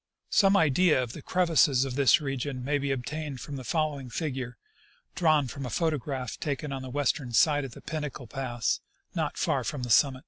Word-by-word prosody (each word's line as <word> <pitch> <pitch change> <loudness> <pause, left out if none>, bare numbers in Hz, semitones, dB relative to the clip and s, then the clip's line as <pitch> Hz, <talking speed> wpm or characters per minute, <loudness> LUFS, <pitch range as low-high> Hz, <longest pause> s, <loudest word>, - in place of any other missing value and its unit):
Some 195 -1 +5
idea 160 -3 +4
of 120 - -6
the - - -8
crevasses 165 -7 +3
of 135 - -4
this 135 -3 +5
region 135 -2 -3
may 145 +1 +1
be 140 0 -2
obtained 135 +2 -3
from 145 - -7
the 130 - -6
following 145 -3 -1
figure, 130 -4 -4 0.6
drawn 155 -5 +3
from 140 +3 -6
a 125 - -4
photograph 140 -3 -2
taken 145 0 -3
on 135 - -4
the 130 - -7
western 135 -2 -1
side 145 +2 +4
of 130 - -9
Pinnacle 150 -5 -4
pass, 120 -1 -2 0.3
not - - -2
far - - +1
from 135 -4 -3
the 120 - -3
summit. 130 +3 +4
140 Hz, 185 wpm, -28 LUFS, 130-150 Hz, 0.6 s, Some